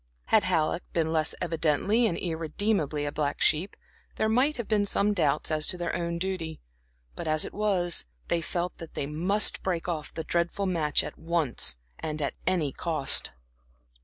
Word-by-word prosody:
Had - - +4
Halleck 160 +2 +1
been 160 -1 +1
less 155 -1 +2
evidently 170 +7 +2
and 170 - -2
irredeemably 160 -2 -1
a 145 - -2
black 145 -1 -2
sheep, 165 +5 +2 0.4
there 220 - +1
might 255 +7 +2
have 235 - -4
been 210 -2 +2
some 205 +1 +1
doubts 155 -4 +1
as 155 -1 +1
to 180 - +3
their 175 -1 -2
own 170 0 -2
duty; 170 -3 -3 0.6
but, - - -5
as 155 0 +2
it - - -8
was, 185 - +1 0.2
they 170 - +1
felt 175 +2 -3
that 165 - -10
they - - -2
must 180 +8 +3
break 175 -3 -2
off 160 -4 -3
the 160 - -5
dreadful 170 +4 0
match 160 -6 +1
at - - -8
once, 160 - +1 0.2
and 155 -1 -4
at 145 - -1
any 170 -6 +1
cost. 155 -2 +2
170 Hz, 175 wpm, -28 LUFS, 155-190 Hz, 0.6 s, Had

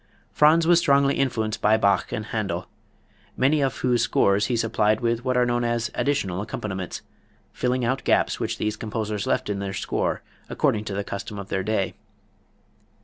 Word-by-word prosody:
Franz 160 +2 +4
was 175 0 +5
strongly 140 -3 +3
influenced 110 -5 -1
by 110 +1 +4
Bach 100 -3 +1
and 105 - -3
Händel, 95 -6 -3 0.7
many 145 +3 +3
of 135 -1 0
whose 125 -2 +1
scores 100 +2 +2
he 120 - 0
supplied 110 -1 +1
with 115 0 -1
what 130 -1 0
are 125 - +4
known 120 0 0
as 120 -1 -1
"additional 100 -11 -1
accompaniments," 95 -4 -5 0.5
filling 125 0 0
out 130 +3 -1
gaps - - +2
which - - -2
these 105 0 -1
composers 105 -2 -3
left - - 0
in 100 -1 -2
their 100 -1 -4
scores - - -2 0.3
according 105 0 0
to 100 - -4
the 100 - -2
custom 100 +1 -6
of 100 -1 -7
their 95 - -1
day. 100 -1 -1
110 Hz, 175 wpm, -24 LUFS, 100-125 Hz, 0.7 s, was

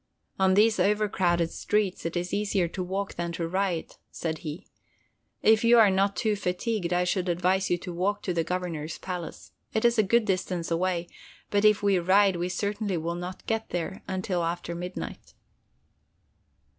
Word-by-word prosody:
"On 190 0 +4
these 215 +2 +4
overcrowded 190 -5 +2
streets 205 -5 -1
it 170 - -3
is 180 +1 -3
easier 200 -3 +1
to 185 - -5
walk 190 +2 -3
than 170 0 -3
to 165 0 -2
ride," 185 -1 -2
said 160 -2 -4
he. 160 +4 -7 0.8
"If 220 +1 +5
you 235 +1 +6
are 215 -4 +7
not 195 +1 +2
too 215 -2 +1
fatigued, 180 0 -2
I 180 0 +2
should 180 0 0
advise 185 +2 +1
you 175 - +2
to 175 0 -7
walk 190 +4 -1
to 180 - -1
the 165 -1 +1
Governor's 165 -3 -3
palace. 180 -3 -6 0.2
It 220 - +1
is 235 -1 +4
a 205 -3 +2
good 235 0 +4
distance 185 -3 -1
away, 175 0 0 0.4
but 205 0 +2
if 210 -1 +4
we 200 -2 +3
ride 190 +1 +4
we 175 +1 -2
certainly 205 0 -2
will 165 +1 -2
not 175 +2 -7
get 225 0 -2
there 175 +2 -3
until 185 -2 -1
after 170 0 -3
midnight." 180 +2 -7
185 Hz, 175 wpm, -27 LUFS, 175-205 Hz, 0.8 s, are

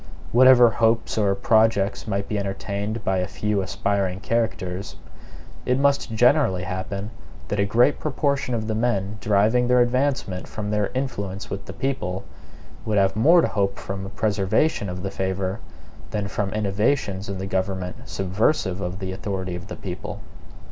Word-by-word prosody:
Whatever 125 0 +7
hopes 115 0 +1
or 100 -3 +2
projects 110 0 +2
might 100 -1 -1
be 105 - -1
entertained 100 +2 -3
by 95 - +1
a 90 - -1
few 105 +1 -1
aspiring 95 0 -1
characters, 100 -4 -2 0.7
it 125 - +1
must 140 -3 +2
generally 95 -6 +3
happen 95 +3 -4 0.4
that 105 - -1
a 100 - +3
great 120 +7 +3
proportion 140 -3 0
of 110 -2 -2
the 110 - -1
men 110 -3 -1
deriving 110 +4 +3
their 125 0 +4
advancement 120 -6 0
from 105 -1 -5
their 105 -1 +1
influence 100 -7 -3
with 100 - -5
the - - -8
people, 95 -9 -2 0.6
would 110 -2 0
have 95 0 +3
more 165 +11 +6
to - - +2
hope 100 -2 -1
from 95 0 -5
a 95 - -6
preservation 105 +4 +1
of 90 +1 -5
the 95 - -3
favor, 95 +1 -2 0.5
than 105 -1 -2
from 100 0 -2
innovations 100 0 0
in 100 - -3
the 95 - -4
government 95 -1 -2
subversive 95 0 0
of 90 0 -3
the 95 -1 -4
authority 95 -2 -4
of 90 +3 -8
the - - -6
people. 90 -2 -6
100 Hz, 160 wpm, -24 LUFS, 95-115 Hz, 0.7 s, Whatever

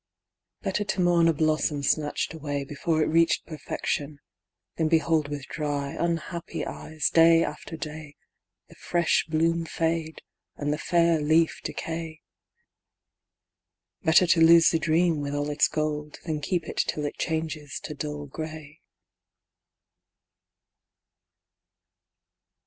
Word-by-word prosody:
Better 210 - -1
to 200 -1 -3
mourn 175 -1 +4
a 165 - +4
blossom 155 -1 0
snatched 150 +2 0
away 145 -3 -3
Before 155 +2 0
it - - +1
reached 165 +1 +2
perfection, 150 -2 -4 0.6
than 160 - +1
behold 160 -2 +2
With 145 -1 -5
dry, 145 -3 -3
unhappy 170 0 -3
eyes, 155 -2 -3
day 165 0 +6
after 160 +2 -6
day, 155 -1 -7 0.5
The - - -16
fresh 170 -1 0
bloom 165 +1 +1
fade, 165 0 -2 0.3
and 145 0 -1
the 150 - -4
fair 170 -1 +2
leaf 160 +2 +2
decay. 160 -1 -5 1.8
Better 160 +1 +5
to 170 -1 +3
lose 165 0 +7
the 165 - +1
dream, 160 0 +2
with 145 0 -3
all 145 0 -1
its 145 - +3
gold, 150 -1 -3
Than 155 -3 -2
keep 175 +3 -1
it - - -7
till 150 - -1
it 145 - -5
changes 160 -3 -3
to 150 - -5
dull 150 0 -5
grey. 155 +1 -8
160 Hz, 125 wpm, -26 LUFS, 150-165 Hz, 1.8 s, lose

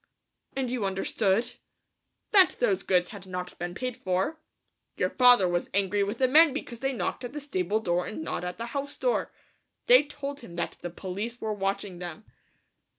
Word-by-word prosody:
"And 260 -2 -1
you 250 -4 -1
understood?" 195 +3 +1 0.8
"That 385 -4 +6
those 200 -6 +2
goods 180 -2 +2
had 195 -3 -10
not 180 -1 -5
been 175 +1 -4
paid 250 +2 -3
for. 195 - -1 0.6
Your - - +1
father 245 -7 +6
was 175 0 -1
angry 200 0 +2
with 205 +3 -3
the 260 - +3
men 305 +2 +6
because 240 -5 -6
they 270 +2 0
knocked 235 +1 -3
at 245 +1 -6
the 295 - -4
stable 215 -8 -1
door 175 -4 0
and 315 - -5
not - - -3
at 180 0 -4
the 230 - -4
house 280 0 -4
door. - - 0 0.5
They - - +8
told 285 -1 -6
him 170 - -11
that 170 - -3
the 175 - -4
police 200 +7 -5
were 215 -1 -2
watching 195 -2 -3
them." 180 +4 -7
210 Hz, 185 wpm, -28 LUFS, 185-260 Hz, 0.8 s, They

